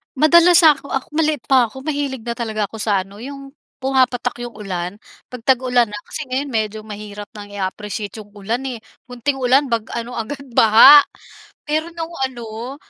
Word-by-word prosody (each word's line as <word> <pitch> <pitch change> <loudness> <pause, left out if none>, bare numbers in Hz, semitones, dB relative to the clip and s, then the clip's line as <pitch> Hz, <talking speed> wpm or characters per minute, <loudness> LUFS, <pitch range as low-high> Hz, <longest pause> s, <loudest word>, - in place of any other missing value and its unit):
Madalas 340 +4 +6
ako 295 -3 +4
ako 265 - -3
maliit 305 -3 0
pa 260 -3 +3
ako 265 +4 -11
mahilig 280 -5 -3
na 235 - -4
talaga 220 -3 -3
ako 220 - -9
sa 200 -3 +1
ano 200 +2 -15
yung 275 +2 -9 0.3
pumapatak 260 -2 +1
yung 235 - -14
ulan, 185 -3 -5 0.3
'pag 250 -2 -10
tag-ulan 250 -3 +2
na 210 - -6
kasi 310 - -5
ngayon 270 +3 -1
medyo 220 -4 -2
mahirap 210 0 -8
nang 205 -1 -10
i-appreciate 205 +1 -5
yung 205 - -24
ulan 215 +5 -4
eh, 255 -3 -5 0.2
konting 250 +3 -3
ulan 265 +2 +2
bag 230 -3 -1
ano 235 +1 -5
agad 235 +5 -5 0.2
baha. 250 +7 +8 0.6
Pero 310 +2 -1
nung 330 0 -5
ano 240 0 -5
245 Hz, 170 wpm, -19 LUFS, 215-275 Hz, 0.6 s, baha